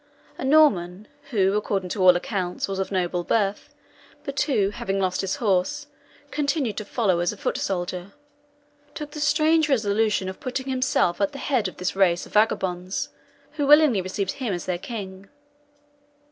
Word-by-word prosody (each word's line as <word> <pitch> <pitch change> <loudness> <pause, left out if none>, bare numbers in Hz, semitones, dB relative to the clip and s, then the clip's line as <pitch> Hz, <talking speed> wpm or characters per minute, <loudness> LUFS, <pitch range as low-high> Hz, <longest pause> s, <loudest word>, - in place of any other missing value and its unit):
"A - - -4
Norman, 215 - +3 0.2
who, 195 -6 +2
according 195 -3 -1
to 195 - -3
all 180 -1 +7
accounts, 180 0 -2
was 195 -1 -4
of 190 - -2
noble 180 -2 -1
birth, 205 0 -1 0.5
but 275 0 -2
who, 220 -10 +1
having 195 -1 -3
lost 185 -1 0
his 195 0 -2
horse, 210 +7 0 0.5
continued 280 -7 -1
to 215 - -4
follow 200 -5 +1
as 175 0 +1
a 210 - -9
foot - - -2
soldier, 180 0 -3 0.8
took 300 -1 -6
the 300 - -7
strange 310 +1 +3
resolution 215 -5 +1
of 190 - -6
putting 260 +1 -4
himself 255 -9 +1
at 295 -1 +1
the - - -7
head 260 -6 0
of 185 - -9
this 180 +1 -2
race 180 -3 +2
of - - -16
vagabonds, 190 -3 0 0.4
who 290 -2 -2
willingly 295 -8 +6
received 190 +1 -2
him 250 -8 -3
as 175 - -6
their 180 -2 -2
king. 195 -2 -7
200 Hz, 170 wpm, -24 LUFS, 185-265 Hz, 0.8 s, all